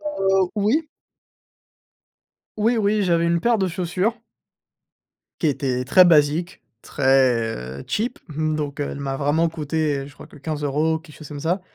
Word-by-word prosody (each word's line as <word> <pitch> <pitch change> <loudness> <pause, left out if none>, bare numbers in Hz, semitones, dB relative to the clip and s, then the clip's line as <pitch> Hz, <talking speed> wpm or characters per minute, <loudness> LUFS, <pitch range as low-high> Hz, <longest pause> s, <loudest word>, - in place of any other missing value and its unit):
Heu, 195 -11 +1
oui. 230 +10 +1 1.7
Oui, 230 +3 +2
oui. 210 0 +2
J'avais 170 -2 +2
une 170 0 +1
paire 235 +2 +3
de 190 - +1
chaussures 185 +6 -1 1.2
qui 160 - +2
était 130 -3 -1
très 185 +8 +6
basique, 160 +2 +2 0.2
très, 120 - +1
heu, - - -10
cheap, 235 +4 -2
mmh, 155 0 -1
donc, 145 -2 -4
heu, 145 - -1
elle 140 - -7
m'a 135 -1 -3
vraiment 150 +4 +2
coûté, 155 -2 -1
heu, 135 - -5
je 145 - -14
crois - - -12
que - - -17
15 150 +1 -4
euros, 155 +3 +1
quelque 160 -2 -16
chose 155 - -11
comme 145 -1 -7
ça 175 +5 0
160 Hz, 170 wpm, -22 LUFS, 145-190 Hz, 1.7 s, très